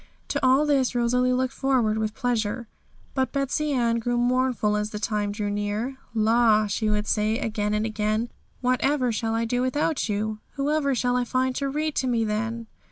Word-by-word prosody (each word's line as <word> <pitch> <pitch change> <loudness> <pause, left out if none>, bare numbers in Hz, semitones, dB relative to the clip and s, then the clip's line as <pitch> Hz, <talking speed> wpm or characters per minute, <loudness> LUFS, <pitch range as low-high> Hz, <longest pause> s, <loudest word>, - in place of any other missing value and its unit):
To - - -2
all 260 +3 +5
this 270 -4 +2
Rosalie 250 +1 +2
looked 255 +1 0
forward 245 -6 +1
with 215 0 -2
pleasure. 235 -1 -1 0.5
But 260 -1 0
Betsey 280 +2 -1
Ann 235 -3 +1
grew 240 +1 -1
very 240 0 +2
mournful 250 -4 +1
as 210 0 -1
the 210 - -5
time 210 -1 -1
drew 205 0 -3
near. 210 +6 -2 0.2
'La!' 220 -1 +4
she 215 +1 -1
would 210 0 0
say, 215 +1 +1
again 210 -4 -1
and 210 +1 0
again; 215 +1 -1 0.3
'whatever 255 +1 +1
shall 225 0 -1
I 230 0 0
do 245 +2 0
without 275 +1 0
you? 215 +1 -2
Whoever 280 -1 0
shall 245 +1 +1
I 250 - +2
find 255 +1 0
to 275 -1 -1
read 305 +2 -1
to 260 - +1
me 230 -2 +1
then?' 225 +2 -2
235 Hz, 190 wpm, -25 LUFS, 215-260 Hz, 0.5 s, all